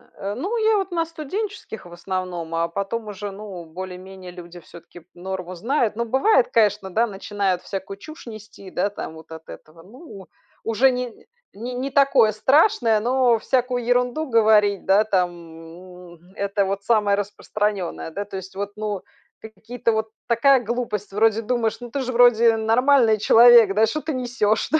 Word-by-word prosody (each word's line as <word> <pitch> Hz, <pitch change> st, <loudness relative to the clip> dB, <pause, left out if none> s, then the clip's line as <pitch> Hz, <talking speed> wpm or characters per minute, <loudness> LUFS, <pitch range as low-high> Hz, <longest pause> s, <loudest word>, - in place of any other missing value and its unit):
э 200 Hz, +1 st, -5 dB
ну, 395 Hz, -, -3 dB
я 440 Hz, -1 st, +3 dB
вот 390 Hz, -1 st, -3 dB
на 335 Hz, -1 st, 0 dB
студенческих, 330 Hz, -, -6 dB
в 175 Hz, -, -12 dB
основном, 175 Hz, -2 st, -5 dB
а 165 Hz, 0 st, 0 dB
потом 200 Hz, +5 st, -4 dB
уже 205 Hz, 0 st, -6 dB
ну 195 Hz, -3 st, -9 dB
более-менее 185 Hz, +2 st, -9 dB
люди 175 Hz, 0 st, -11 dB
всё-таки 170 Hz, +1 st, -15 dB
норму 185 Hz, 0 st, -6 dB
знают. 235 Hz, -, -1 dB
Ну 235 Hz, +1 st, -2 dB
бывает, 265 Hz, -, +3 dB
конечно, 210 Hz, -3 st, +1 dB
да, 225 Hz, +5 st, +2 dB
начинают 195 Hz, -3 st, -2 dB
всякую 195 Hz, 0 st, -6 dB
чушь 310 Hz, +9 st, -12 dB
нести, 215 Hz, -4 st, -11 dB
да, 200 Hz, -, 0 dB
там 200 Hz, -, -7 dB
вот 160 Hz, 0 st, -15 dB
от 160 Hz, 0 st, -10 dB
этого. 165 Hz, +1 st, -13 dB
Ну, 205 Hz, -, -13 dB, 0.4 s
уже 225 Hz, +4 st, +3 dB
не 250 Hz, -2 st, -6 dB, 0.3 s
не 240 Hz, +4 st, -7 dB
не 265 Hz, +2 st, -4 dB
такое 275 Hz, -5 st, +4 dB
страшное, 230 Hz, -, +3 dB
но 245 Hz, 0 st, +2 dB
всякую 250 Hz, +1 st, -1 dB
ерунду 250 Hz, +5 st, +1 dB
говорить, 215 Hz, -4 st, +3 dB
да, 195 Hz, +2 st, +4 dB
там, 185 Hz, -4 st, +1 dB, 0.8 s
м- 170 Hz, -, -18 dB, 0.2 s
это 200 Hz, 0 st, -1 dB
вот 195 Hz, +1 st, -3 dB
самое 210 Hz, -2 st, +2 dB
распространенное, 205 Hz, -3 st, -3 dB
да. 200 Hz, +5 st, -5 dB
То 195 Hz, -1 st, -7 dB
есть 190 Hz, 0 st, -10 dB
вот 200 Hz, +1 st, -4 dB
ну 210 Hz, -3 st, -4 dB, 0.4 s
ка 220 Hz, -, -9 dB
какие-то 230 Hz, +2 st, -3 dB
вот 220 Hz, 0 st, -2 dB, 0.2 s
такая 250 Hz, +2 st, +4 dB
глупость, 225 Hz, -3 st, -4 dB
вроде 220 Hz, +1 st, +2 dB
думаешь: 225 Hz, -1 st, -1 dB
"Ну 240 Hz, -1 st, -9 dB
ты 280 Hz, -, -3 dB
же, 255 Hz, -1 st, -3 dB
вроде, 235 Hz, -1 st, +5 dB
нормальный 225 Hz, 0 st, +3 dB
человек, 230 Hz, -1 st, +6 dB
да! 220 Hz, +1 st, +4 dB
Что 305 Hz, +8 st, -3 dB
ты 315 Hz, -, -4 dB
несешь, 240 Hz, -4 st, 0 dB
да?" 315 Hz, -, +3 dB
215 Hz, 170 wpm, -22 LUFS, 195-245 Hz, 0.8 s, человек